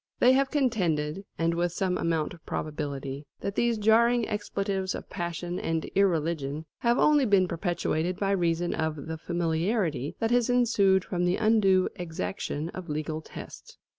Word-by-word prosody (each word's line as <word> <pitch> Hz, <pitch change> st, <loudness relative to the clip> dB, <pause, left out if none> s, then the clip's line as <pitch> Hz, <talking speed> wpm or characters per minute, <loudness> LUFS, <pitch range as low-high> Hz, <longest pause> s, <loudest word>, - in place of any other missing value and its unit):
They 250 Hz, -, +6 dB
have 270 Hz, +1 st, +3 dB
contended, 190 Hz, -, 0 dB
and 165 Hz, 0 st, +1 dB
with 175 Hz, 0 st, 0 dB
some 185 Hz, 0 st, 0 dB
amount 165 Hz, -3 st, -1 dB
of 170 Hz, -, -15 dB
probability, 145 Hz, -2 st, -4 dB
that 200 Hz, -, -2 dB
these 235 Hz, +2 st, +1 dB
jarring 230 Hz, +2 st, +4 dB
expletives 200 Hz, -2 st, -2 dB
of -, -, -9 dB
passion 175 Hz, 0 st, -3 dB
and 165 Hz, -1 st, -1 dB
irreligion 160 Hz, -5 st, 0 dB
have 235 Hz, +1 st, +2 dB
only 300 Hz, -2 st, +4 dB
been 200 Hz, -6 st, +4 dB
perpetuated 175 Hz, 0 st, -1 dB
by 195 Hz, -1 st, 0 dB
reason 175 Hz, -2 st, +1 dB
of 155 Hz, -2 st, -2 dB
the 160 Hz, 0 st, -5 dB
familiarity 165 Hz, -, -1 dB
that 225 Hz, 0 st, 0 dB
has 245 Hz, 0 st, +3 dB
ensued 205 Hz, -6 st, +3 dB
from 180 Hz, -1 st, -1 dB
the 180 Hz, +1 st, +2 dB
undue 210 Hz, -4 st, +4 dB
exaction 160 Hz, -, -4 dB
of 180 Hz, -2 st, -8 dB
legal 155 Hz, +1 st, -3 dB
tests. -, -, -11 dB
175 Hz, 155 wpm, -28 LUFS, 160-210 Hz, -, They